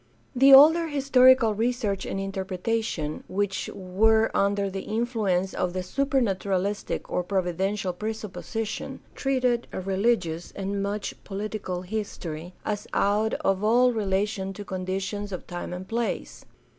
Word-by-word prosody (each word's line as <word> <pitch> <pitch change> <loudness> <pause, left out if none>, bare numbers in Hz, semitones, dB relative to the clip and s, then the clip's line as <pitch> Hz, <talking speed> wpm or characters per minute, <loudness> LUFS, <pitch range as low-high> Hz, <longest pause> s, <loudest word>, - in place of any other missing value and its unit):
The 270 +2 +6
older 320 +5 +8
historical 260 -5 +5
research 220 -3 -1
and 195 - -3
interpretation, 190 -3 -2
which 195 0 -2
were 220 +4 +2
under 200 0 +2
the 195 0 -4
influence 210 -5 -1
of 180 -1 -1
the 185 0 -2
supernaturalistic 200 -5 -1
or - - +1
provi 180 -1 -1
dential 190 0 -1
presupposition, 220 +1 -5
treated 255 -3 0
religious 190 -3 0
and 200 0 -2
much 200 +1 -3
political 195 -3 -4
history 180 -4 -5
as 210 -1 -3
out 210 +2 +2
of 195 +1 +1
all 245 +3 +4
relation 195 -2 -1
to 205 +1 -8
conditions 190 +2 -3
of 185 - -6
time 175 0 -6
and 180 +1 -6
place. 235 0 -3
200 Hz, 125 wpm, -26 LUFS, 190-225 Hz, -, older